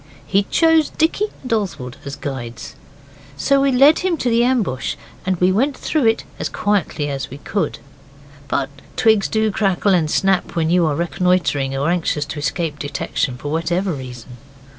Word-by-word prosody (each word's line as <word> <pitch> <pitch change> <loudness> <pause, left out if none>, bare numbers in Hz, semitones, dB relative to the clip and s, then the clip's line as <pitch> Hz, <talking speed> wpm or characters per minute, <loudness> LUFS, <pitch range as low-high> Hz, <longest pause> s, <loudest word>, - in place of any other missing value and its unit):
He 195 +1 +1
chose 325 -2 +4
Dicky 325 +6 +1 0.2
and 250 - -2
Oswald 155 - -3
as 140 0 -5
guides. 120 -4 -6 0.6
So 275 - +3
we 275 0 +3
led 275 +5 +6
him 360 -3 0
to 250 -4 0
the 230 +1 +4
ambush, 225 - 0 0.3
and 190 - +2
we 180 +1 +4
went 265 +8 +1
through 300 -7 +1
it 225 - +2 0.2
as - - -2
quietly 200 -7 0
as 135 -2 -4
we 135 - -8
could. 200 +7 -2 0.7
But 140 0 -1 0.2
twigs 220 -4 +3
do 220 -1 +1
crackle 195 -1 +1
and 165 -4 +2
snap 195 +2 +2
so - - -13
when 165 -1 0
you 175 -2 +4
are 150 - 0
reconnoitring, 170 -5 0
or 140 +5 +1
anxious 160 -4 0
to 150 +1 -6
escape 150 +1 -2
detection 145 -2 -2
for 145 +3 -5
whatever 175 +4 0
reason. 125 -3 -9
180 Hz, 175 wpm, -20 LUFS, 145-220 Hz, 0.7 s, led